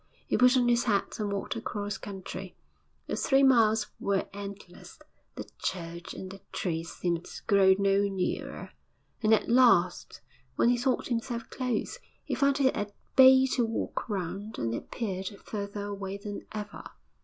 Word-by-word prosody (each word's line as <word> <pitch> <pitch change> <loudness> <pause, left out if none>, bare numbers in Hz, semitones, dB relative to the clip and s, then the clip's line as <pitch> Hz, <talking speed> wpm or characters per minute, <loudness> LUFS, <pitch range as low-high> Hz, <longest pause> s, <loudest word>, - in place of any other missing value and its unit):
He - - 0
put 250 +1 +5
on 245 -1 +3
his 240 0 +3
hat 205 -2 0
and 210 -1 -1
walked 200 -1 -3
across 205 -2 -4
country; 190 -1 -7 0.5
the - - -3
three 270 -1 +3
miles 225 -5 +4
were 200 -1 0
endless; 200 -2 -9 0.4
the - - -7
church 170 -2 -4
and 185 - -7
the 195 - -11
trees 165 -2 -3
seemed 175 -1 -2
to - - -9
grow 195 -1 +5
no 200 0 +3
nearer, 190 -2 -3 0.5
and 215 -1 +2
at 220 - +4
last, 230 -8 +3 0.4
when 235 - +3
he 245 - +3
thought 255 +1 0
himself 235 -1 -3
close, 250 -4 -2 0.2
he - - -4
found 280 0 +2
he 280 - +1
had 260 - +2
a - - -30 0.2
bay 260 0 +8
to 245 - +2
walk 225 +1 -3
round, 200 +2 -4
and 115 0 -1
it - - -1
appeared 195 -5 -4 0.2
further 205 -1 -4
away 200 -1 -5
than 205 0 -7
ever. 210 -1 -6
205 Hz, 165 wpm, -29 LUFS, 195-235 Hz, 0.5 s, bay